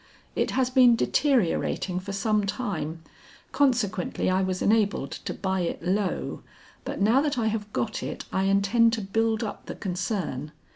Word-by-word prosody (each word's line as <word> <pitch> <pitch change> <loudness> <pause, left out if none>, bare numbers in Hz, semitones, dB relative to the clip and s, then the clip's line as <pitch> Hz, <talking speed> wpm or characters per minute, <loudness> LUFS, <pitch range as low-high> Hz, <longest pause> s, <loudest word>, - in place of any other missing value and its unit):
It - - +1
has 255 -1 +2
been 250 -2 +6
deteriorating 230 - +1
for 190 +2 -7
some 210 +1 +1
time, 165 - -3 0.5
consequently 245 -11 +1
I 185 +1 +2
was 185 -1 -1
enabled 205 -10 +2
to - - -5
buy 190 -1 -2
it 170 -1 -3
low, 190 +2 -1 0.4
but - - -5
now 225 +7 +4
that 290 -3 -1
I 230 - +1
have 210 -1 -4
got 220 +1 -2
it - - -5
I 190 - +1
intend 200 +4 +3
to 225 - -1
build 220 +3 0
up 210 - -6
the - - -5
concern. 180 - -3
205 Hz, 160 wpm, -26 LUFS, 185-230 Hz, 0.5 s, been